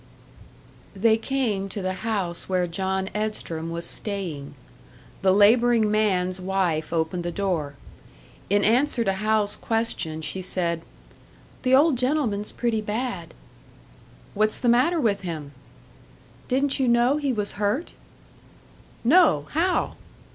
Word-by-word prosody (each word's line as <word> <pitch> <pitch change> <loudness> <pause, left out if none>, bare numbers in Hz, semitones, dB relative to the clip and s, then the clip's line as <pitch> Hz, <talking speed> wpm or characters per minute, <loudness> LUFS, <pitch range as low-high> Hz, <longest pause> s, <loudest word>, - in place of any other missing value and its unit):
They 220 +3 +4
came 225 -5 -1
to 205 - -5
the 185 0 -1
house 195 -7 -2
where 185 -1 +1
John 190 +2 -2
Edstrom 210 -6 -3
was 170 0 -4
staying. 165 -11 -5 0.7
The 190 -1 +4
labouring 220 +2 +4
man's 190 -4 +1
wife 180 -5 -1
opened 165 +1 -1
the 175 - -3
door. 170 -7 -2 0.7
In 205 +1 +3
answer 245 +2 +3
to 195 -3 +1
Hal's 210 +1 +1
question, 225 -9 -2
she 190 - -3
said, 170 -2 -2 0.8
"The 255 0 +4
old 285 -2 +4
gentleman's 250 -7 0
pretty 230 -3 -1
bad." 215 -4 -4 1.0
"What's 215 +1 +1
the 245 - +1
matter 295 +9 +3
with 220 -8 +1
him?" 160 -6 -6 1.0
"Didn't 275 +2 +1
you 265 - +2
know 240 +4 +3
he 285 -3 0
was 210 -4 -2
hurt?" 210 +11 -1 1.1
"No. 265 - +5
How?" 355 +4 0
205 Hz, 125 wpm, -24 LUFS, 180-240 Hz, 1.1 s, No